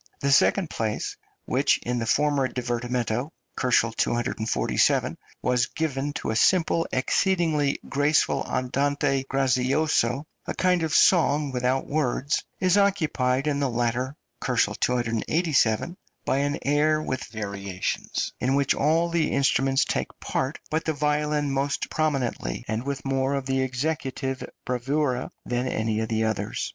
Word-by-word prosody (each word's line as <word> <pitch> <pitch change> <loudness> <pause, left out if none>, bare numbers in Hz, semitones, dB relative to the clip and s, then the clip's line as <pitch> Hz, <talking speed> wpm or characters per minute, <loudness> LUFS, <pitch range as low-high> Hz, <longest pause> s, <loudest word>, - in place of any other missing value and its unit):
The 140 - 0
second 160 +4 +3
place 110 -1 -2 0.3
which - - +2
in 125 0 -1
the 115 - -3
former 145 +1 +2
divertimento 120 0 -2 0.3
(247 115 -2 +1
K.) - - -17 0.2
was 125 -2 +2
given 145 -3 -2
to - - -3
a - - -2
simple, 165 +4 +3
exceedingly 155 0 +1
graceful 145 +2 +2
andante 135 +1 0
grazioso, 135 0 +1 0.2
a - - -3
kind 180 -2 +2
of 160 -1 -1
song 150 -5 +4
without 125 +1 0
words 145 -1 0 0.2
is 185 +2 +3
occupied 150 -10 +1
in 145 -2 0
the 140 -2 +1
latter 120 +3 -1 0.3
(287 120 +2 +1
K.) - - -19 0.3
by 130 - +1
an 145 +2 0
air 150 +2 +2
with 130 -4 -3
variations, 100 -3 -4
in 130 +2 +1
which 140 -1 +2
all 160 +4 +2
the 170 -2 +1
instruments 135 0 +2
take - - -1
part, 130 +3 -2
but 155 +1 0
the 160 - 0
violin 150 0 0
more 135 +1 0 0.2
prominently, 135 - -1
and 110 +1 -1
with 140 -1 -4
more 135 0 0
of 135 -1 -3
executive 130 0 -2 0.2
bravura 130 +1 -1 0.2
than 125 +1 -1
any 110 -2 -1
of 110 - -2
the 110 0 +1
others. 110 -1 -2
135 Hz, 135 wpm, -25 LUFS, 125-150 Hz, 0.3 s, song